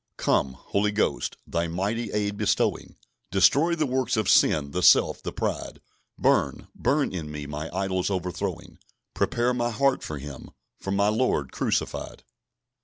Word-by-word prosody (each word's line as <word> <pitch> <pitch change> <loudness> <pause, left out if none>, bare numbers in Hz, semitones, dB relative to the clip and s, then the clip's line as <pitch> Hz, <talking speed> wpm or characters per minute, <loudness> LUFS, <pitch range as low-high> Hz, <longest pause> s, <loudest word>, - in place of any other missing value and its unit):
"Come, 65 - +1
Holy 100 +10 -1
Ghost, 105 - -1
Thy 85 0 -1
mighty 100 +8 -2
aid 105 -1 -1
bestowing; - - 0 0.3
Destroy 140 - +4
the 155 -2 0
works 130 -2 0
of 110 -3 0
sin, 70 -2 +4
the 90 - -2
self, - - +5
the - - -4
pride; - - -3 0.4
Burn, - - +1
burn 145 0 +1
in 80 -5 -5
me, 75 -1 -6
my 75 +2 -5
idols 95 0 -1
overthrowing: 90 -2 -4 0.3
Prepare 120 +1 +1
my 120 -1 0
heart 135 +4 +1
for 75 - -5
Him, 70 -1 -9 0.3
for - - -6
my 100 +1 +2
Lord 105 - 0
crucified." - - -2
100 Hz, 150 wpm, -26 LUFS, 80-120 Hz, 0.4 s, self